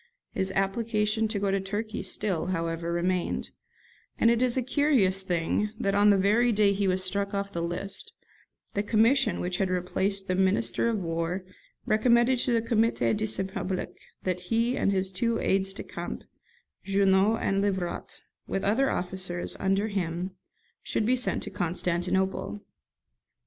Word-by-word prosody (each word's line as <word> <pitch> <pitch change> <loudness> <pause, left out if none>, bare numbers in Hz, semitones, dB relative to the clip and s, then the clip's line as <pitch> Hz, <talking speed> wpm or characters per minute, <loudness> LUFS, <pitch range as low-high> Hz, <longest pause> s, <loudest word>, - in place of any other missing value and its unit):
His 190 0 -1
application 210 +2 0
to 215 -1 -2
go 200 -1 0
to 195 - +1
Turkey 210 +4 -4
still, 185 -5 -2
however, 165 -1 -2
remained; 175 +1 -1 0.7
and 230 - +4
it 235 0 +1
is 255 0 +3
a 255 - +1
curious 250 -9 +2
thing 180 +3 0
that, 195 - 0
on 205 +1 +5
the 200 - +5
very 215 +5 +3
day 205 -2 +3
he 200 0 0
was 185 0 +1
struck 200 +2 -1
off 200 0 -2
the 170 - -2
list, 175 +4 -2 0.6
the 200 - 0
commission 220 +1 +3
which 180 0 -1
had 190 -2 0
replaced 190 +2 -1
the 185 - -1
Minister 185 - +2
of 225 - 0
War 170 +1 -2 0.4
recommended 235 +3 +3
to 245 - 0
the 230 -1 +2
'Comité 230 -1 +2
de 215 +1 -1
Saint 190 -2 +1
Public' 190 -2 -3 0.3
that 180 -1 -1
he 230 +7 0
and 200 - +1
his 190 -1 0
two 230 +5 0
aides 195 0 +1
de 195 - -7
camp, - - -6 0.6
Junot 195 +2 +3
and 195 0 0
Livrat, 190 -3 -3 0.3
with 195 - -2
other 240 +7 +2
officers, 180 -1 -2
under 195 +2 +1
him, 180 -2 -3 0.5
should 215 - -1
be 250 +3 +3
sent 250 0 +1
to - - -5
Constantinople. 180 - -1
195 Hz, 160 wpm, -27 LUFS, 185-220 Hz, 0.7 s, on